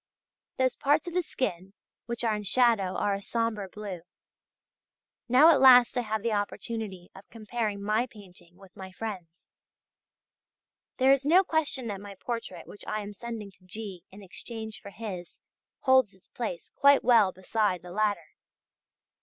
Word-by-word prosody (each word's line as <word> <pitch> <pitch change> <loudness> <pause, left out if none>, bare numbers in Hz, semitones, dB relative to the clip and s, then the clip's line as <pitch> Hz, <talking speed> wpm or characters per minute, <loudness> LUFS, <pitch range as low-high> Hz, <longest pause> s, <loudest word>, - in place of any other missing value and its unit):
Those 255 -1 +1
parts 295 +4 +1
of 345 - -5
the 360 - +2
skin 195 - -4 0.3
which 235 0 -4
are 225 -2 +1
in 210 - -4
shadow 210 -3 +2
are 205 - +1
a 195 - -3
sombre 220 -3 -2
blue. 200 -4 -7 1.3
Now 280 +7 +7
at 305 - +4
last 250 -2 +8
I 245 - +1
have 220 -2 -3
the 235 - 0
opportunity 205 -2 -4
of 195 - -15
comparing 215 -2 -4
my 215 +4 +1
painting 185 -6 -15
with 195 -1 -18
my 190 -2 -9
friends'. 185 -5 -8 1.5
There 265 0 +5
is 275 0 +3
no 345 +7 +5
question 315 -7 -1
that 200 -1 -5
my 200 -1 -9
portrait 195 -5 -6
which 205 - -12
I 215 - -2
am 205 0 -7
sending 220 -1 -7
to 185 - -26
G. 190 -2 -8
in 200 +2 -13
exchange 220 +3 -8
for - - -9
his, 200 -5 -8 0.4
holds 260 -7 +4
its 190 - -26
place 215 -9 -5
quite 280 0 +5
well 225 -6 +5
beside 190 -1 -1
the 180 - -10
latter. 205 -4 -1
215 Hz, 160 wpm, -28 LUFS, 195-240 Hz, 1.5 s, last